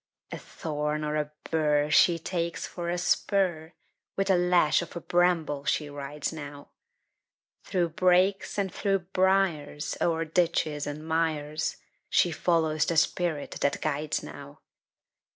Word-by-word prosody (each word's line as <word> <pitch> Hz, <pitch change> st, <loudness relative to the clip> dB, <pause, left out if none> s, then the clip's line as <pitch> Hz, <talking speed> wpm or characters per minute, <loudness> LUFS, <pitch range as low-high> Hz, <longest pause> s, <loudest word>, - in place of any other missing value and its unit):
A -, -, -4 dB
thorn 150 Hz, -1 st, -3 dB
or 150 Hz, 0 st, -2 dB
a 150 Hz, -1 st, -1 dB, 0.2 s
bur 150 Hz, -2 st, +2 dB
She 170 Hz, +1 st, +5 dB
takes 170 Hz, 0 st, -3 dB
for 175 Hz, -1 st, -5 dB
a 175 Hz, -, -1 dB
spur; 175 Hz, -3 st, 0 dB, 0.4 s
With 195 Hz, 0 st, +1 dB
a -, -, +5 dB
lash 175 Hz, -3 st, +3 dB
of 170 Hz, -, -8 dB
a -, -, -3 dB
bramble 170 Hz, -5 st, +1 dB
she 150 Hz, 0 st, -1 dB
rides 145 Hz, +2 st, -5 dB
now, 145 Hz, -2 st, -9 dB, 1.0 s
Through 175 Hz, -3 st, 0 dB
brakes 185 Hz, +4 st, +2 dB
and 195 Hz, -2 st, -1 dB
through 195 Hz, -3 st, 0 dB
briars, 180 Hz, -6 st, +1 dB
O'er 165 Hz, -1 st, +1 dB
ditches 155 Hz, -3 st, 0 dB
and 150 Hz, +2 st, -6 dB
mires, 155 Hz, -2 st, -1 dB, 0.3 s
She 175 Hz, -, +3 dB
follows 160 Hz, -2 st, +1 dB
the 170 Hz, -, 0 dB
spirit 160 Hz, -2 st, 0 dB
that 140 Hz, -, +1 dB
guides 150 Hz, 0 st, -1 dB
now. 70 Hz, -, -11 dB
160 Hz, 135 wpm, -27 LUFS, 150-175 Hz, 1.0 s, She